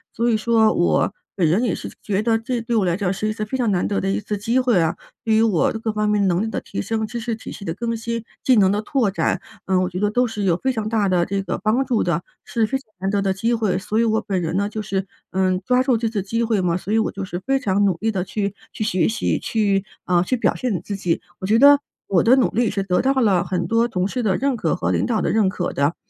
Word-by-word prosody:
所 235 +1 +1
以 225 - +3
说 220 0 +3
我 175 +3 +2 0.2
本 175 -4 +2
人 185 +10 +2
也 240 - +1
是 - - -5
觉 205 0 0
得 225 0 +2
这 235 +1 -3
对 235 +1 -2
我 210 -4 +2
来 170 -1 +1
讲 195 -2 -1
是 210 +2 -2
一 215 - -1
次 215 - -4
非 215 +5 -3
常 235 -5 +1
难 180 - +1
得 200 - 0
的 195 - -2
一 195 - 0
次 210 0 -4
机 230 +5 +1
会 245 -7 +3
啊， 165 +1 +1 0.3
对 225 - +2
于 220 - +4
我 215 -7 +2
这 220 - -4
各 220 -1 -2
方 210 0 -1
面 205 -2 +2
能 180 +2 +1
力 - - -2
的 220 - -3
提 - - -6
升、 220 +2 -2
知 235 +2 -5
识 230 -1 -3
体 - - -9
系 200 - -9
的 165 - -2
更 230 +4 -3
新、 230 0 -4 0.2
技 260 - +4
能 190 -2 +5
的 205 - 0
拓 235 -2 +1
展， 195 - -1 0.2
嗯， 185 -1 +2
我 185 - 0
觉 180 0 -5
得 210 0 +1
都 245 +2 +2
是 210 -2 -4
有 180 -4 +3
非 265 - +1
常 220 -4 -3
大 215 -3 +1
的 175 -2 +2
这 200 +1 -2
个 - - -3
帮 220 +7 +1
助 235 -4 +1
的， 170 -1 0 0.2
是 225 -2 0
非 270 - 0
常 270 - -15 0.2
难 190 +1 -1
得 205 - +1
的 195 -1 +1
机 225 +5 -1
会。 210 -5 0
所 205 +3 -3
以 230 - +4
我 220 -1 +1
本 200 -3 -2
人 165 +1 -2
呢 200 +1 0
就 215 0 -5
是， 195 -2 -2 0.2
嗯， 185 -1 +1
抓 250 0 +3
住 255 -3 +2
这 225 +1 -1
次 220 -2 -2
机 230 +5 -1
会 220 -4 +1
嘛。 175 -1 +1
所 200 +3 -4
以 225 - +4
我 220 - 0
就 195 0 -5
是 175 -1 -5
非 270 0 +2
常 200 -4 +1
努 190 -4 +2
力 225 +1 0
地 190 -4 -1
去 200 +1 -3 0.2
去 - - -4
学 185 -4 +1
习， 225 - 0
去 200 -3 0 0.2
啊， 175 -1 +3
去 250 +8 0
表 - - +2
现 255 -2 -2
我 - - -1
自 200 +1 -5
己。 180 -4 -1 0.2
我 190 - -4
觉 215 +3 +4
得 285 +3 +7 0.3
我 185 -4 +3
的 240 +3 +5
努 260 - +3
力 235 0 +1
是 195 - -2
得 180 -2 +1
到 265 - +2
了 205 -9 +3
很 180 -1 -2
多 230 +6 +2
同 185 -5 -1
事 250 +4 -3
的 200 -5 +1
认 275 -1 0
可 230 - 0
和 - - -1
领 - - +1
导 225 -3 +1
的 - - 0
认 215 -3 +3
可 190 - -3
的。 140 +4 +1
210 Hz, 320 characters per minute, -21 LUFS, 190-230 Hz, 0.3 s, 得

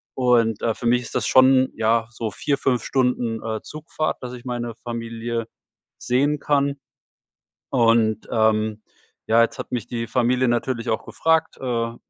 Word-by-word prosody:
Und, 120 -4 +2
äh, 115 - +1
für - - -8
mich 125 +1 +3
ist - - -8
das - - 0
schon, 130 0 +5
ja, 115 +1 +1
so 110 -1 -4
4, 145 +5 -1
5 125 -4 0
Stunden, 125 -4 0
äh, 110 -1 -3
Zugfahrt, 155 0 -4
dass 125 0 -6
ich 120 -1 -10
meine 120 -2 -4
Familie 115 -1 -4 0.5
sehen 140 +4 +1
kann. 140 -1 +1 0.9
Und, 115 -4 +2
ähm, 110 -1 +1 0.5
ja, 115 +1 +5
jetzt 115 - -1
hat - - -7
mich 120 -4 -2
die 115 -1 -4
Familie 125 +1 +2
natürlich 120 0 -1
auch 110 - -1
gefragt, 160 0 +1
äh, - - -15
w 115 -2 -2
120 Hz, 165 wpm, -22 LUFS, 115-130 Hz, 0.9 s, schon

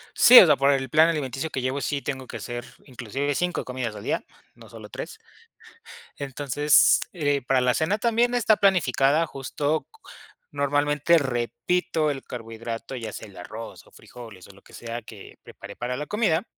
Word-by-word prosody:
Sí, 250 +1 +10
o - - +9
sea, 150 - +5
por 140 +1 +3
el 135 -1 -1
plan 160 +5 +5
alimenticio 150 -1 -3
que 130 - -4
llevo, 130 +2 -2
sí 140 +3 -2
tengo 130 -2 -5
que - - -7
hacer, 120 -1 -6 0.2
inclusive, 135 +2 -4
5 180 0 -1
comidas 125 -4 -5
al - - -9
día, - - -2 0.3
no - - -16
solo - - -11
3. - - -8 1.0
Entonces, 145 +1 +3
eh, 145 -5 0
para 130 0 +1
la 125 -1 +2
cena 185 +7 0
también 235 +2 +1
está 225 -3 +3
planificada, 160 -5 +2
justo 145 +2 -3
c 450 - -21 0.5
normalmente, 145 +2 +2
repito 135 +5 -1
el 135 -2 -4
carbohidrato, 115 +1 -7
ya 115 -3 -6
sea - - -9
el 100 - -17
arroz 110 +6 -9
o - - -22
frijoles, 110 -7 -13
o - - -14
lo 100 0 -20
que - - -21
sea 120 0 -6
que 105 -3 -13
preparé 100 +1 -12
para 125 +1 -4
la 150 - -4
comida. 210 -4 0
135 Hz, 180 wpm, -24 LUFS, 120-155 Hz, 1.0 s, Sí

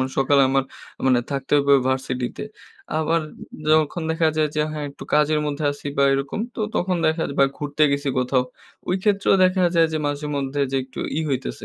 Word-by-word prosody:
মানে 130 0 -1
সকালে 135 +1 +4
আমার, 135 0 +2 0.4
মানে 125 -2 +4
থাকতে 140 0 -4
হবে 140 0 +4
ভার্সিটিতে। 130 -2 -2 0.6
আবার 160 +1 +1 0.5
যখন 155 +2 +2
দেখা 160 0 +2
যায় 155 -1 +2
যে 150 - +1
হ্যাঁ, 150 -1 -4
একটু - - -11
কাজের 150 0 +3
মধ্যে 145 +1 -3
আছি 145 - -10
বা 140 - +4
এরকম; 135 +8 -2
তো - - -6
তখন 180 0 0
দেখার 160 +1 0
বা 140 - +6
ঘুরতে 145 +1 -2
গেছি 140 0 -1
কোথাও। 125 0 +1 0.5
ওই 180 - +2
ক্ষেত্রেও 200 -2 +3
দেখা 185 0 +2
যায় 165 -1 +5
যে, 155 - 0
মাঝে-মধ্যে 145 -1 -2
যে - - +1
একটু 130 0 -13 0.2
ই - - +1
হইতেছে, 135 -1 -3
145 Hz, 185 wpm, -22 LUFS, 135-160 Hz, 0.6 s, বা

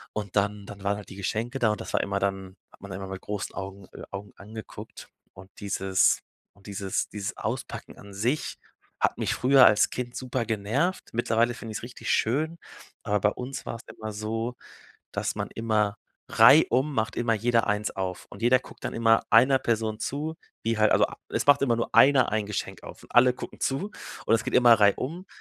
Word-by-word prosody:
Und 105 -2 -5
dann 105 0 0
dann 100 -1 -10
waren 100 +1 0
halt 105 - -10
die - - -10
Geschenke 110 +6 -3
da 110 -3 +3
und 105 - -3
das - - -7
war - - +2
immer 100 0 -1
dann 95 -1 -3
hat - - -21
man 100 - -9
immer 95 0 -6
mit 95 -1 -7
großen 105 -1 -5
Augen 95 0 -7
äh, - - -9
Augen 100 0 -7
angeguckt 110 +2 -10 0.2
und 95 +2 -13
dieses 95 -1 +2 0.3
und 100 - -19
dieses 100 -1 -2
dieses 100 -1 -5
Auspacken - - -5
an 100 0 -13
sich 120 +10 -1 0.4
hat - - +1
mich - - 0
früher 130 +1 +6
als 105 - +5
Kind 125 -1 -5
super 130 -2 -3
genervt. 115 - -1
Mittlerweile 120 +1 +1
finde 115 -2 -8
ich's - - -4
richtig 120 - -4
schön, 155 +9 +1 0.5
aber 105 0 +1
bei 105 - +4
uns 135 +2 -6
war's 115 - -5
immer 110 -1 -7
so, 115 +3 -3 0.6
dass - - -2
man - - -3
immer 105 -2 0 0.4
reihum 135 +4 +6
macht 110 +1 -1
immer 115 -1 +1
jeder 115 +1 +1
eins 105 -1 0
auf 95 -1 -4
und 100 - -11
jeder 125 +2 +5
guckt - - -15
dann - - -3
immer 115 -1 +4
einer 130 +4 +6
Person 110 -2 -1
zu, 155 +3 -3 0.3
die 115 0 0
halt 110 0 +4
also - - +5
ab - - -12
es - - -1
macht 145 -1 +6
immer 120 -4 +3
nur 115 - -3
einer 135 -2 +6
ein 110 -2 0
Geschenk 105 - -5
auf - - -11
und - - -17
alle 125 +1 +6
gucken - - -9
zu 140 +10 -1 0.4
und 115 - +4
es 115 - -5
geht 130 - -3
immer 120 -2 +7
reihum, 130 - +1
110 Hz, 205 wpm, -26 LUFS, 100-125 Hz, 0.6 s, immer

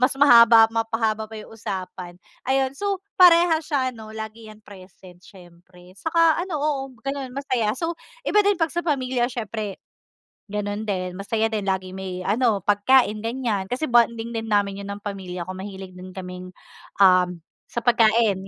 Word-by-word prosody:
mas 255 +2 +3
mahaba 235 -5 +7
mapahaba 225 -1 -1
pa 220 - -11
'yong 215 +1 -10
usapan. 185 -4 -6 0.3
Ayun, 265 0 +1
so 395 +5 -3 0.2
parehas 335 -3 +6
siya 270 -4 0
ano, 220 -1 -11
lagi 220 +1 -8
'yan 215 0 -14
present 185 -2 -15
siyempre 180 -1 -17
saka 330 +2 +2
ano 350 -3 -3
oo, 290 -1 -1 0.2
gano'n 275 -2 -5
masaya. 255 -6 -1
So, 330 +3 -3 0.3
iba 420 - +3
din 405 -2 +3
pag 325 -2 0
sa 345 - -1
pamilya 260 -6 0
siyempre 220 -5 -5 0.7
gano'n 210 +1 -4
din, 185 -2 -2
masaya 220 +2 -1
din 210 -3 -3
lagi 190 -1 -1
may 185 -1 -6
ano, 210 -2 +1
pagkain, 210 +1 +3
ganiyan, 225 -4 -2
kasi 250 +7 -4
bonding 235 -1 +2
din 225 -1 -4
namin 200 -2 0
'yon 200 - -7
ng 205 - -14
pamilya 185 -3 -5
ko, 185 - -7
mahilig 190 0 -8
din 185 0 -12
kaming 180 -1 -8 0.5
um, 180 -2 +4 0.2
sa 235 - -5
pagkain 220 -4 +3
220 Hz, 160 wpm, -23 LUFS, 190-255 Hz, 0.7 s, mahaba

